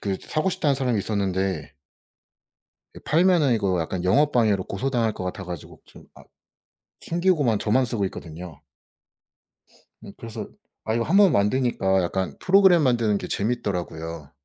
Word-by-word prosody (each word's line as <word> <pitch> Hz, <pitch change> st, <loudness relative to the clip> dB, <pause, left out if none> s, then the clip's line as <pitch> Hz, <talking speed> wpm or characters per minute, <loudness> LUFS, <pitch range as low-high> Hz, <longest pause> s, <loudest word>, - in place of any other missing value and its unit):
그 100 Hz, -2 st, -2 dB
사고 155 Hz, +5 st, -1 dB
싶다는 160 Hz, -6 st, 0 dB
사람이 125 Hz, -4 st, 0 dB
있었는데 95 Hz, -6 st, -2 dB, 1.2 s
그 -, -, -13 dB
팔면은 165 Hz, -4 st, +3 dB
이거 100 Hz, -5 st, 0 dB
약간 85 Hz, +2 st, -4 dB
영업 145 Hz, +11 st, +3 dB
방해로 105 Hz, -6 st, +2 dB
고소당할 115 Hz, +1 st, -1 dB
것 95 Hz, -, -7 dB
같아 90 Hz, +1 st, -5 dB
가지고 85 Hz, -4 st, -9 dB
좀 -, -, -17 dB
아 -, -, -15 dB, 0.8 s
튕기고만 165 Hz, -, +1 dB
저만 120 Hz, +6 st, +1 dB
쓰고 115 Hz, -4 st, -2 dB
있거든요. 85 Hz, -3 st, -9 dB, 1.4 s
음 100 Hz, -, -10 dB
그래서 115 Hz, -1 st, -7 dB, 0.4 s
아 110 Hz, -, -1 dB
이거 115 Hz, 0 st, 0 dB
1 170 Hz, +9 st, +1 dB
번 200 Hz, -4 st, +6 dB
만드니까 100 Hz, -3 st, +1 dB
약간 95 Hz, +1 st, -3 dB
프로그램 190 Hz, -3 st, +5 dB
만드는 115 Hz, -6 st, +2 dB
게 -, -, -7 dB
재밌더라고요. 85 Hz, -, -3 dB
110 Hz, 325 characters per minute, -24 LUFS, 95-135 Hz, 1.4 s, 번